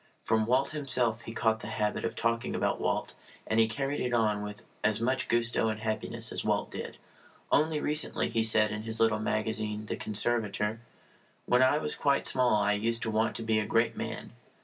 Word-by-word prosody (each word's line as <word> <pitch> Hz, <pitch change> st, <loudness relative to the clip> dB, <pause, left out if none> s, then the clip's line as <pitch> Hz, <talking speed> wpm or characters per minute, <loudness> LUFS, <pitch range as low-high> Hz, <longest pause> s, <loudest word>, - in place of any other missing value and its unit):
From 110 Hz, -1 st, +1 dB
Walt 130 Hz, +3 st, +2 dB
himself 125 Hz, -6 st, +1 dB
he 115 Hz, -, -8 dB
caught 110 Hz, -1 st, +1 dB
the 105 Hz, -, -8 dB
habit 105 Hz, -1 st, -1 dB
of 115 Hz, -1 st, -3 dB
talking 115 Hz, +1 st, -1 dB
about -, -, 0 dB
Walt, -, -, -1 dB, 0.3 s
and 110 Hz, -, +1 dB
he 110 Hz, -, +5 dB
carried 135 Hz, +5 st, -2 dB
it 125 Hz, -1 st, 0 dB
on 105 Hz, -3 st, +1 dB
with 105 Hz, 0 st, -7 dB, 0.2 s
as 110 Hz, -1 st, +2 dB
much 130 Hz, +3 st, 0 dB
gusto 120 Hz, -1 st, +1 dB
and 110 Hz, 0 st, -3 dB
happiness 110 Hz, -1 st, -3 dB
as -, -, -2 dB
Walt -, -, 0 dB
did. -, -, -6 dB, 0.5 s
Only 155 Hz, +1 st, +3 dB
recently 150 Hz, +1 st, 0 dB
he 115 Hz, -, 0 dB
said 110 Hz, -1 st, +3 dB
in 110 Hz, 0 st, -4 dB
his 110 Hz, 0 st, -3 dB
little 110 Hz, -1 st, +3 dB
magazine 110 Hz, 0 st, -2 dB
The -, -, -3 dB
Conservator: 105 Hz, 0 st, 0 dB, 0.7 s
When 125 Hz, +1 st, +3 dB
I 130 Hz, +3 st, +4 dB
was 150 Hz, -, -1 dB
quite 140 Hz, -1 st, +1 dB
small 125 Hz, -3 st, +3 dB
I 105 Hz, 0 st, +2 dB
used 115 Hz, +3 st, 0 dB
to 110 Hz, -, -1 dB
want 110 Hz, +1 st, +1 dB
to 115 Hz, -, -4 dB
be 110 Hz, -1 st, +2 dB
a 105 Hz, -, -1 dB
great 115 Hz, +1 st, +2 dB
man. -, -, -5 dB
115 Hz, 200 wpm, -29 LUFS, 110-120 Hz, 0.7 s, he